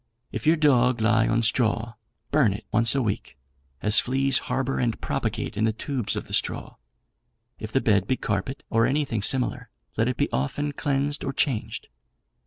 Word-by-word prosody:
If -, -, -4 dB
your 160 Hz, -, +6 dB
dog 125 Hz, -6 st, +3 dB
lie 110 Hz, 0 st, +3 dB
on 115 Hz, +1 st, +1 dB
straw, 115 Hz, 0 st, +1 dB, 0.4 s
burn 140 Hz, -9 st, +3 dB
it 105 Hz, -, -8 dB
once 115 Hz, +3 st, +3 dB
a 135 Hz, -, +1 dB
week, 100 Hz, -, -3 dB, 0.5 s
as 105 Hz, 0 st, +5 dB
fleas 135 Hz, +1 st, +1 dB
harbour 130 Hz, +1 st, -1 dB
and 115 Hz, -3 st, -1 dB
propagate -, -, -3 dB
in 105 Hz, -, -1 dB
the 110 Hz, -, +1 dB
tubes 125 Hz, 0 st, -3 dB
of -, -, -4 dB
the -, -, -10 dB
straw. -, -, -1 dB, 0.8 s
If 110 Hz, -1 st, -7 dB
the 135 Hz, -, +2 dB
bed 100 Hz, -3 st, +2 dB
be 130 Hz, -, +1 dB
carpet, 105 Hz, +7 st, -3 dB
or 115 Hz, 0 st, +3 dB
anything 135 Hz, -6 st, -1 dB
similar, 125 Hz, +4 st, 0 dB, 0.3 s
let -, -, +2 dB
it -, -, -1 dB
be -, -, +1 dB
often 145 Hz, -, -1 dB
cleansed 145 Hz, 0 st, -1 dB
or 135 Hz, -, -3 dB
changed. 130 Hz, -7 st, -1 dB
120 Hz, 180 wpm, -25 LUFS, 110-135 Hz, 0.8 s, your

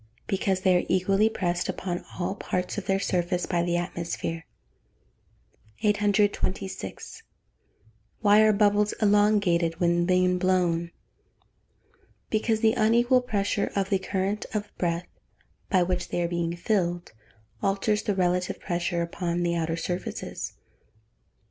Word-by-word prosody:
_ -, -, -27 dB, 0.2 s
Because 190 Hz, -1 st, 0 dB
they 185 Hz, -1 st, +4 dB
are 180 Hz, -, +1 dB
equally 195 Hz, +3 st, +3 dB
pressed 175 Hz, -5 st, -2 dB
upon 175 Hz, -2 st, -3 dB
all 185 Hz, +1 st, -1 dB
parts 185 Hz, -1 st, -3 dB
of 205 Hz, -, -11 dB
their 195 Hz, -, +2 dB
surface 180 Hz, -2 st, 0 dB
by 175 Hz, -2 st, 0 dB
the 175 Hz, 0 st, 0 dB
atmosphere. 170 Hz, -1 st, -4 dB, 1.4 s
826. 205 Hz, -, -1 dB, 1.0 s
Why 210 Hz, 0 st, +6 dB
are 215 Hz, 0 st, +6 dB
bubbles 210 Hz, 0 st, +3 dB
elongated 200 Hz, -6 st, +2 dB
when 175 Hz, 0 st, +2 dB
being 180 Hz, 0 st, +3 dB
blown? 175 Hz, -2 st, +1 dB, 1.4 s
Because 220 Hz, 0 st, +1 dB
the 220 Hz, -1 st, +4 dB
unequal 240 Hz, +3 st, +3 dB
pressure 205 Hz, -4 st, -1 dB
of 195 Hz, 0 st, -1 dB
the 195 Hz, -, +3 dB
current 195 Hz, +2 st, -2 dB
of 205 Hz, -1 st, -4 dB
breath 170 Hz, 0 st, -1 dB, 0.6 s
by 185 Hz, -4 st, +4 dB
which 180 Hz, 0 st, -2 dB
they 175 Hz, -, -1 dB
are -, -, +1 dB
being 170 Hz, 0 st, -2 dB
filled, 175 Hz, -2 st, -1 dB, 0.5 s
alters 200 Hz, +1 st, +1 dB
the 205 Hz, -, -1 dB
relative 180 Hz, -1 st, 0 dB
pressure 175 Hz, -1 st, -1 dB
upon 170 Hz, 0 st, -2 dB
the 170 Hz, 0 st, +1 dB
outer 165 Hz, 0 st, -1 dB
surfaces. 175 Hz, +2 st, -4 dB
185 Hz, 130 wpm, -26 LUFS, 175-205 Hz, 1.4 s, Why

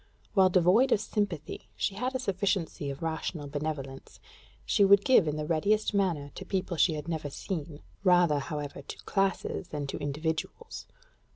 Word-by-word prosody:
While 190 Hz, -2 st, +5 dB
devoid 185 Hz, +9 st, +4 dB
of -, -, +4 dB
sympathy, 205 Hz, -7 st, -3 dB
she 200 Hz, -, -1 dB
had 250 Hz, +6 st, -3 dB
a -, -, 0 dB
sufficiency 190 Hz, -, -1 dB
of 140 Hz, +3 st, -6 dB
rational 160 Hz, -1 st, -3 dB
benevolence: 140 Hz, -2 st, -5 dB, 0.5 s
she 205 Hz, -, +3 dB
would 200 Hz, 0 st, +6 dB
give 250 Hz, -10 st, +5 dB
in 150 Hz, -, 0 dB
the 150 Hz, 0 st, -3 dB
readiest 205 Hz, +8 st, +1 dB
manner 170 Hz, -8 st, 0 dB
to -, -, -7 dB
people 190 Hz, -1 st, -2 dB
she 160 Hz, 0 st, +3 dB
had 150 Hz, +1 st, -6 dB
never 160 Hz, -3 st, -3 dB
seen 155 Hz, 0 st, -5 dB, 0.2 s
rather, 175 Hz, -5 st, +4 dB
however, 145 Hz, -1 st, -5 dB
to -, -, -9 dB
classes 195 Hz, -2 st, -1 dB
than 150 Hz, -4 st, -4 dB
to 135 Hz, -, -5 dB
individuals. 160 Hz, -, -4 dB
170 Hz, 165 wpm, -29 LUFS, 150-195 Hz, 0.5 s, would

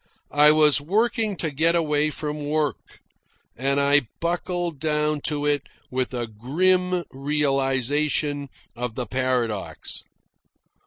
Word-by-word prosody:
I 150 Hz, +1 st, +7 dB
was 150 Hz, -2 st, +5 dB
working 215 Hz, +5 st, 0 dB
to 160 Hz, -2 st, -2 dB
get 165 Hz, +4 st, +2 dB
away 150 Hz, -2 st, +1 dB
from 150 Hz, 0 st, -5 dB
work, 150 Hz, 0 st, -2 dB, 0.6 s
and 135 Hz, +3 st, 0 dB
I 140 Hz, -2 st, +4 dB
buckled 175 Hz, -2 st, -2 dB
down 150 Hz, 0 st, 0 dB
to 145 Hz, -2 st, -1 dB
it 145 Hz, -1 st, +2 dB, 0.3 s
with 130 Hz, 0 st, -1 dB
a 120 Hz, -1 st, -2 dB
grim 180 Hz, -, 0 dB
realisation 140 Hz, +1 st, 0 dB, 0.3 s
of 120 Hz, -1 st, -4 dB
the 125 Hz, -, -3 dB
paradox. 125 Hz, -4 st, -2 dB
145 Hz, 115 wpm, -24 LUFS, 135-160 Hz, 0.6 s, I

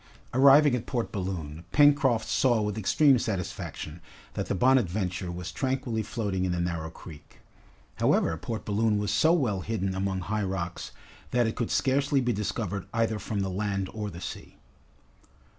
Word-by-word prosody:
Arrived 140 Hz, +2 st, +6 dB
at 125 Hz, -2 st, -2 dB
Port 120 Hz, -4 st, -2 dB
Balloon, 85 Hz, -6 st, -4 dB
Pencroft 140 Hz, -6 st, +4 dB
saw 120 Hz, -4 st, +2 dB
with 105 Hz, -1 st, -1 dB
extreme 130 Hz, +5 st, +4 dB
satisfaction 90 Hz, -6 st, -4 dB, 0.3 s
that -, -, -3 dB
the -, -, -1 dB
"Bonadventure" 95 Hz, -6 st, +1 dB
was 90 Hz, 0 st, -6 dB
tranquilly 130 Hz, -4 st, -1 dB
floating 105 Hz, -4 st, -2 dB
in 90 Hz, -, 0 dB
the 90 Hz, -, -2 dB
narrow 85 Hz, -2 st, -2 dB
creek. 80 Hz, -1 st, -13 dB, 0.6 s
However, 80 Hz, -, +2 dB
Port 110 Hz, +7 st, -5 dB
Balloon 105 Hz, +1 st, +1 dB
was 105 Hz, 0 st, -1 dB
so 160 Hz, -, +4 dB
well 125 Hz, -, +1 dB
hidden 95 Hz, -3 st, -2 dB
among 95 Hz, 0 st, -2 dB
high 105 Hz, +4 st, -2 dB
rocks, 95 Hz, -3 st, -3 dB, 0.4 s
that 120 Hz, -1 st, +2 dB
it 110 Hz, -, -2 dB
could 120 Hz, -, -2 dB
scarcely 140 Hz, +1 st, +2 dB
be 120 Hz, -2 st, +1 dB
discovered 100 Hz, -1 st, -3 dB
either 115 Hz, -1 st, 0 dB
from 105 Hz, -2 st, -3 dB
the 95 Hz, -, -1 dB
land 100 Hz, 0 st, -2 dB
or 105 Hz, -1 st, -4 dB
the 85 Hz, -2 st, -9 dB
sea. -, -, -8 dB
105 Hz, 160 wpm, -27 LUFS, 95-120 Hz, 0.6 s, Arrived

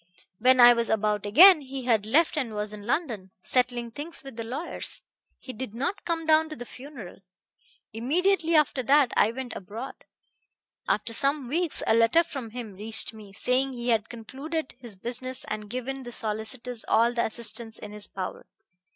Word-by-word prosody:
When 255 Hz, +2 st, +5 dB
I 240 Hz, 0 st, +10 dB
was 235 Hz, -1 st, -1 dB
about 210 Hz, -1 st, 0 dB
again 330 Hz, -, +8 dB
he 270 Hz, -1 st, -7 dB
had 225 Hz, -4 st, +1 dB
left 310 Hz, +8 st, +3 dB
and 250 Hz, -8 st, -2 dB
was 210 Hz, 0 st, -3 dB
in 210 Hz, 0 st, -9 dB
London, 235 Hz, -, -2 dB
settling 245 Hz, -2 st, 0 dB
things 295 Hz, +6 st, -7 dB
with 270 Hz, -3 st, -10 dB
the 230 Hz, -, -4 dB
lawyers. 265 Hz, +9 st, -3 dB, 0.3 s
He 255 Hz, -, -9 dB
did 235 Hz, -2 st, -7 dB
not 280 Hz, +12 st, -3 dB
come 330 Hz, -1 st, -2 dB
down 315 Hz, 0 st, +4 dB
to 310 Hz, -, -6 dB
the 245 Hz, -, -8 dB
funeral. 250 Hz, -9 st, -10 dB, 0.7 s
Immediately 330 Hz, -, +1 dB
after 300 Hz, -3 st, +3 dB
that 275 Hz, +1 st, +4 dB
I 210 Hz, -, +4 dB
went 255 Hz, 0 st, -6 dB
abroad. 225 Hz, +8 st, -7 dB, 0.9 s
After 230 Hz, -, 0 dB
some 275 Hz, +1 st, +1 dB
weeks 330 Hz, +4 st, -1 dB
a -, -, +3 dB
letter 230 Hz, +9 st, +4 dB
from 270 Hz, -8 st, -7 dB
him 225 Hz, -2 st, -7 dB
reached 220 Hz, +4 st, +1 dB
me, 210 Hz, -2 st, -12 dB
saying 255 Hz, +6 st, 0 dB
he 240 Hz, 0 st, -4 dB
had 225 Hz, -1 st, +1 dB
concluded 275 Hz, +7 st, -5 dB
his 235 Hz, -5 st, -8 dB
business 255 Hz, +5 st, -4 dB
and 215 Hz, -1 st, -5 dB
given 255 Hz, +3 st, -4 dB
the 240 Hz, -2 st, -8 dB
solicitors 225 Hz, +2 st, -3 dB
all 235 Hz, +2 st, +3 dB
the 235 Hz, -, +1 dB
assistance 225 Hz, 0 st, -2 dB
in 210 Hz, -, -9 dB
his 210 Hz, -1 st, -3 dB
power. 185 Hz, -1 st, -6 dB
245 Hz, 175 wpm, -27 LUFS, 220-275 Hz, 0.9 s, I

